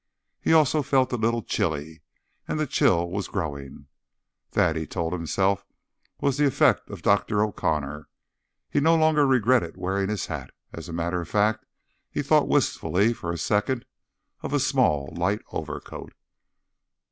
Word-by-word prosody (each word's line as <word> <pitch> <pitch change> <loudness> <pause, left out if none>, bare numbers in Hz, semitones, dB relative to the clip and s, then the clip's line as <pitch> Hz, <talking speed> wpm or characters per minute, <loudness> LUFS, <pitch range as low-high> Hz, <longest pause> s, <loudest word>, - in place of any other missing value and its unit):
He - - +1
also 155 -1 +4
felt 130 -2 +1
a - - +2
little 115 0 0
chilly, 80 -1 -2 0.5
and 155 - -2
the 155 - +1
chill 85 - +2
was 100 +1 -3
growing. 70 -6 -5 0.7
That, 80 - +2
he 80 -1 -3
told 85 -1 -3
himself, 95 +3 0 0.6
was 140 -1 0
the 145 0 +4
effect 135 - +2
of - - -9
Dr. 105 0 +2
O'Connor. 75 -8 -2 0.6
He - - 0
no 160 +3 +4
longer 155 -2 +4
regretted 125 -8 +2
wearing 95 +2 -1
his 105 -4 -2
hat. - - -7 0.2
As 85 +2 -8
a - - -6
matter 85 +1 -2
of 85 - -9
fact, 105 +1 +1 0.4
he - - -3
thought - - +3
wistfully 105 +6 +2
for 85 -6 -5
a 85 - -3
second 110 +7 0 0.6
of - - -5
a - - +3
small, 70 -2 +1
light 95 +5 0
overcoat. - - -6
100 Hz, 155 wpm, -25 LUFS, 85-125 Hz, 0.7 s, also